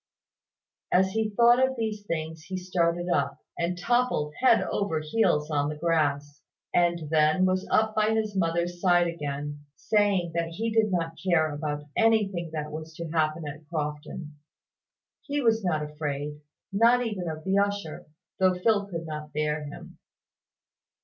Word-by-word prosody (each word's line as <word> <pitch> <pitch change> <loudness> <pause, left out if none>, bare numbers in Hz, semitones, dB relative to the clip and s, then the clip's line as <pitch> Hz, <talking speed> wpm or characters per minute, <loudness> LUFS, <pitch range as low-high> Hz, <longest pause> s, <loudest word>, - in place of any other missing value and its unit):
As 190 +1 +3
he 220 +1 0
thought 235 +4 +5
of 260 0 +1
these 220 -3 -3
things, 160 -1 -4
he 190 - -4
started 175 -1 0
up, 175 - 0 0.2
and 175 +1 -1
toppled 235 -7 +1
head 255 -3 +5
over 165 -6 -1
heels 155 -2 +1
on 145 -1 +1
the 150 - -4
grass, 145 -3 0 0.3
and 170 -2 +2
then 155 +3 +4
was 185 0 0
up 220 0 +2
by 215 +1 +2
his 215 -2 -1
mother's 175 0 0
side 175 -2 +4
again, 145 -3 -4
saying 200 -5 +1
that 170 0 0
he 225 +5 -2
did 220 -2 +2
not 165 -3 -2
care 160 -5 +2
about 150 0 -3
anything 205 -7 +2
that 150 -1 -4
was 155 +1 -7
to 170 0 -6
happen 155 -1 0
at 145 +2 -8
Crofton; 150 0 -4 0.9
he 290 0 -2
was 225 -4 +2
not 155 -5 0
afraid, 150 -1 -4 0.3
not 235 +4 +4
even 190 -6 -3
of 155 0 -6
the 190 +1 +2
usher, 200 -5 -2 0.3
though 185 -1 +4
Phil 205 +1 +2
could 170 -4 -5
not 150 -1 -6
bear 150 0 -1
him. 145 - -10
170 Hz, 155 wpm, -27 LUFS, 155-205 Hz, 0.9 s, thought